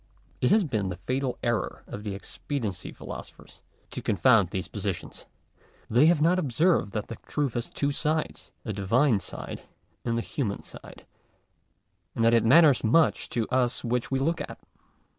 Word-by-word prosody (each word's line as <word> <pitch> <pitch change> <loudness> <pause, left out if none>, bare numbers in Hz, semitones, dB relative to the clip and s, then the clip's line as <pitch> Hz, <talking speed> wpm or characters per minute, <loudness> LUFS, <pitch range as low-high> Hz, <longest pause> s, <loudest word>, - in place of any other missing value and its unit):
It 125 - +3
has 215 0 +5
been 110 - -1
the 90 - -4
fatal 130 +4 -2
error 120 -2 -1
of 105 - -7
the 100 -2 -4
expediency 105 - -4
philosophers - - -10 0.3
to - - -5
confound 105 -3 +4
these 95 -2 -3
positions. - - -5 0.7
They 125 +7 +6
have 170 -2 +4
not 180 +3 +4
observed 155 - +2
that 105 - -3
the 115 - -7
truth 145 -5 -1
has 120 0 -3
two 140 0 -1
sides, 155 +2 -2 0.2
a 110 - -3
Divine 110 +5 +2
side - - -6 0.4
and 115 -1 -1
a - - 0
human 110 -8 -3
side; - - -13 1.1
and 115 - +1
that 115 - +5
it 115 - +4
matters 140 +3 +6
much 145 +8 +3
to 115 -2 -1
us 125 -1 +1
which 120 0 -1
we 135 - 0
look 160 +5 0
at. - - -7
125 Hz, 165 wpm, -27 LUFS, 110-145 Hz, 1.1 s, They